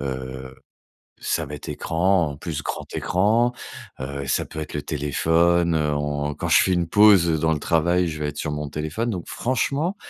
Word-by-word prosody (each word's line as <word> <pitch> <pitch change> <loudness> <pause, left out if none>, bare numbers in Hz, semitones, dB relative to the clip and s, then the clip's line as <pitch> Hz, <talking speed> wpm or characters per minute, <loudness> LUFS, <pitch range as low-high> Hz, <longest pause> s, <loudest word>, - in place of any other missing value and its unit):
heu. 65 -1 -6 0.7
Ça 80 -2 0
va 75 - -7
être 75 - -9
écran, 85 -1 +1
en 70 - -7
plus, 80 0 -5
grand - - -4
écran. 110 +6 +2 0.5
Heu, 70 +1 -5
ça 65 - 0
peut - - -10
être 75 - -7
le 75 - -2
téléphone, 80 +4 +1
heu, 75 -1 0
en 75 0 -2
quand - - -4
je - - +6
fais 95 - +1
une 85 -2 0
pause 100 -3 +6
dans 80 +1 +2
le 75 - -2
travail, 85 +2 +2
je 80 -1 -5
vais 75 - -1
être 75 - -6
sur 75 - -2
mon 75 0 -4
téléphone. 80 +11 -3
Donc 90 -5 -5
franchement 140 - -1
80 Hz, 195 wpm, -23 LUFS, 75-90 Hz, 0.7 s, je